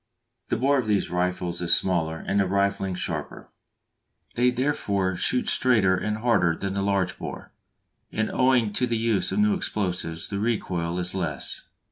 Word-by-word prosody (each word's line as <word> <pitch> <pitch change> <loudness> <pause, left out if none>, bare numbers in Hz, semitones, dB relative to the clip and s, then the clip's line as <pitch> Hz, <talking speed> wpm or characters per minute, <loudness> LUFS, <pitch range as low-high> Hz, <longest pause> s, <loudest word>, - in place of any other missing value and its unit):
The - - +1
bore 135 +4 +3
of 120 - -3
these 105 -2 +1
rifles 90 0 -1
is 85 - +4
smaller 80 -4 0
and 100 - +1
the 95 - +2
rifling 100 -1 0
sharper; - - -5 0.8
they 125 +1 +3
therefore 105 -8 0
shoot 125 +7 +1
straighter 110 -7 +3
and 105 +3 -2
harder 110 -8 +2
than 95 +2 -3
the 100 - -1
large 100 -2 0
bore, - - -7 0.6
and 110 0 -1
owing 125 -5 +3
to 125 +4 +1
the 120 -1 0
use 110 -3 0
of - - -2
new 210 0 +4
explosives 90 - -2
the 100 - -3
recoil 90 -6 -1
is 90 0 -1
less. 85 -8 -4
100 Hz, 165 wpm, -25 LUFS, 90-115 Hz, 0.8 s, is